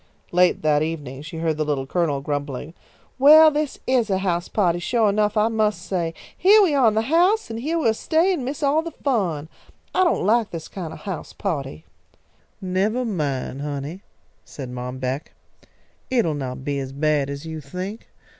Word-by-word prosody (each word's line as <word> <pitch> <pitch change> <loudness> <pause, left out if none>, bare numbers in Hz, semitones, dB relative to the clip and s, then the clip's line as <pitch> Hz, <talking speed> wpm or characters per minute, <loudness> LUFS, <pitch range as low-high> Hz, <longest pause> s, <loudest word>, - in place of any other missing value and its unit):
Late 180 -1 +3
that 150 -1 +3
evening 150 -4 -4
she 155 +2 -8
heard 160 -1 -1
the 155 - +1
Little 145 -3 -1
Colonel 150 -2 0
grumbling: 145 +1 -4 0.5
"Well, 310 +3 +8
this 300 -1 -2
is 250 -4 +2
a 190 - +2
house 180 -2 -1
pahty 175 -5 +1
suah 225 +1 +2
enough, 210 +1 +1
I 210 +1 +4
must 215 -2 +1
say! 170 -3 -2 0.2
Heah 405 +4 +6
we 340 -6 +2
are 270 -4 +4
in 215 - +2
the 220 - +2
house, 350 - +2
and 225 - -4
heah 310 +7 -1
we'll 235 -9 +2
stay 325 - +2
and 305 -8 -3
miss 270 +4 -4
all 290 +3 +3
the 335 - -5
fun. 195 - -1 0.5
I 370 - +3
don't 350 - +1
like 225 +1 +3
this 165 -2 -7
kind 175 -5 -6
of - - -10
a - - -16
house 190 -6 -6
pahty!" 140 - -4 0.8
"Nevah 200 +7 0
mine, 145 - -2
honey," 145 +5 -5 0.4
said 130 -4 -8
Mom 125 +1 -5
Beck. 130 +3 -4 0.8
"It'll 230 -11 +2
not 130 -2 -5
be 140 -1 -1
as 135 0 -5
bad 145 -1 +1
as 140 +2 -6
you 160 -1 -6
think. 185 - -7
180 Hz, 190 wpm, -23 LUFS, 145-235 Hz, 0.8 s, Well